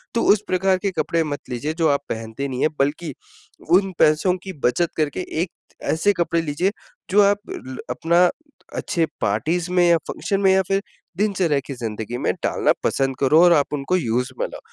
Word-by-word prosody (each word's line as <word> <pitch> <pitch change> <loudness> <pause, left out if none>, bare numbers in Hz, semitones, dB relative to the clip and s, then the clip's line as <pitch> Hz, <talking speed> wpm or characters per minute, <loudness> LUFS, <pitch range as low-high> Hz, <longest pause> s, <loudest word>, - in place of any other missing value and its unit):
तो 230 - +2
उस 210 - -2
प्रकार 185 +1 +2
के 195 - +2
कपड़े 165 -1 +1
मत 145 -2 -4
लीजिए 140 +6 -3
जो - - +5
आप 140 -1 +2
पहनते 110 +5 -4
नहीं 130 -1 -4
हैं, 155 - +3
बल्कि 145 +5 -1 0.6
उन 190 +2 +4
पैसों 155 +4 +4
की 190 - -6
बचत 160 +8 +2
करके 155 +4 -1 0.2
एक 180 - -5 0.4
ऐसे 205 +6 +2
कपड़े 170 -2 0
लीजिए 165 +5 0 0.4
जो 205 +2 +5
आप 200 0 +4
अ - - -4
ल 130 0 -7
अपना 170 +7 +3 0.5
अच्छे 165 -2 0 0.2
पार्टीज 160 - 0
में 180 -1 +3
या 170 - +6
फंक्शन 195 - -2
में 190 -1 +5
या 190 - +4
फिर 195 +1 +1 0.4
दिनचर्या 185 -8 +1
की 140 - -5
ज़िंदगी 115 -1 -5
में - - 0
डालना - - +2
पसंद 135 -1 0
करो 150 +4 +5
और 175 -1 +7
आप 150 -2 +1
उनको 145 +6 0
यूज़ 125 -3 -1
में - - +1
लाओ। - - -10
165 Hz, 195 wpm, -22 LUFS, 135-185 Hz, 0.6 s, और